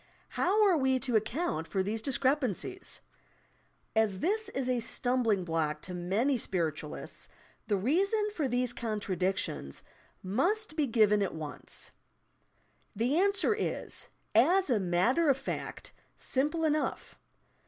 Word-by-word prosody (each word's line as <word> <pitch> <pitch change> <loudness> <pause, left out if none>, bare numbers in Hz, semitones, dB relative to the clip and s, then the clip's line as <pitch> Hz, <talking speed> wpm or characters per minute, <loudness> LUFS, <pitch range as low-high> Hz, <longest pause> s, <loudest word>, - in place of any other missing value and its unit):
How 415 +4 +2
are 370 -5 +4
we 265 -2 +2
to 250 -4 -1
account 220 - 0
for 190 -2 0
these 215 +3 -2
discrepancies 275 - -1 0.9
I - - +5
As 210 -4 +2
this 430 - 0
is 265 -1 -3
a 250 -1 +1
stum 250 +2 0
bling 205 -5 +2
block 155 -2 -1
to 185 - -6
many 205 +10 0
spiritualists, 160 -7 -3 0.4
the 205 -3 +2
reason 390 - +1
for 305 -8 -1
these 245 0 0
contradictions 190 - -2 0.4
must 325 - +1
be 300 -3 +1
given 215 -3 +4
at 195 - -1
once. 155 -2 -7 1.0
The 245 - +1
answer 400 +1 +3
is, 430 - -2 0.3
as 335 - +4
a 230 - +3
matter 200 - +2
of 270 - +4
fact, 270 - -6 0.2
simple 300 +5 -1
enough. 305 0 -1
245 Hz, 130 wpm, -30 LUFS, 195-310 Hz, 1.0 s, I